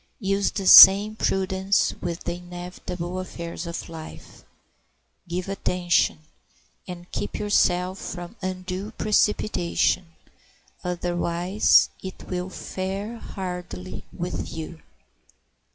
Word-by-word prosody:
Use 195 -1 +1
the 195 - -4
same 200 +3 +10
prudence 190 -1 +1
with 170 0 -4
the 175 0 -3
inevitable 180 0 -6
affairs 170 -2 -6
of 170 - -5
life; 160 -1 -11 0.8
give 180 +2 -3
attention, 180 -4 0 0.7
and 175 -1 -9
keep 205 - -4
yourself 185 -2 +1
from 175 +3 -7
undue 185 +1 -4
precipitation, 210 -4 +1 0.8
otherwise 175 +2 +2
it 190 0 -9
will 180 0 -3
fare 195 +5 -5
hardly 180 - -7
with 180 0 -5
you. 160 0 -7
180 Hz, 95 wpm, -24 LUFS, 175-195 Hz, 0.8 s, same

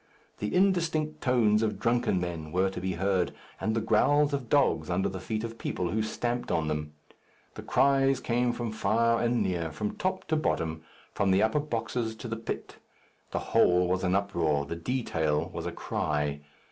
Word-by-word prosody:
The 105 - -2
indistinct 165 -5 +1
tones 115 -5 +3
of 110 -1 0
drunken 115 -5 +1
men 85 -3 -4
were 95 +2 +1
to 95 - -6
be 95 0 -1
heard, 95 +1 +1 0.3
and 110 0 -1
the 115 - +1
growls 145 +7 +3
of 130 -5 -3
dogs 135 - +2
under 90 +2 +1
the 95 - -5
feet 110 +3 -3
of 115 0 -6
people 90 -1 -2
who 110 - 0
stamped 120 +2 -2
on 80 -1 0
them. 75 -1 -3 0.6
The - - -8
cries 135 -1 +3
came 120 +1 +1
from 120 -2 -4
far 115 +2 +2
and 120 0 +2
near, 85 -3 -1
from 105 +6 -3
top 185 0 -2
to 160 - +2
bottom, 80 - -1 0.3
from 100 - +1
the 95 +2 +4
upper 110 +7 +2
boxes 115 -4 -2
to 115 - -7
the 115 - -3
pit. 115 - -6 0.5
The - - -3 0.2
whole 90 0 +5
was 95 +1 0
an 90 0 +2
uproar, 85 -8 +1
the 85 - -5
detail 80 - -1
was - - -4
a - - -3
cry. 75 -1 -2
110 Hz, 185 wpm, -28 LUFS, 90-120 Hz, 0.6 s, whole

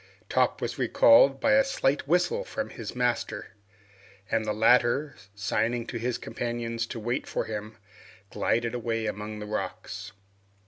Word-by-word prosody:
Top - - +1
was - - -3
recalled - - +6
by 280 - +2
a 275 0 +6
slight 145 - 0
whistle 180 - +2
from 275 - -4
his 115 -4 -7
master, 120 -3 -1 0.8
and 110 - +1
the 105 - 0
latter, 120 +6 +3 0.2
signing 110 +4 0
to 120 - -5
his 120 +1 -1
companions 115 0 -3
to 115 - -6
wait 120 +4 -2
for - - -2
him, 110 0 -6 0.5
glided 115 0 0
away 115 -2 -2
among 105 0 -4
the 105 - -6
rocks. 105 -2 -5
115 Hz, 145 wpm, -27 LUFS, 110-125 Hz, 0.8 s, recalled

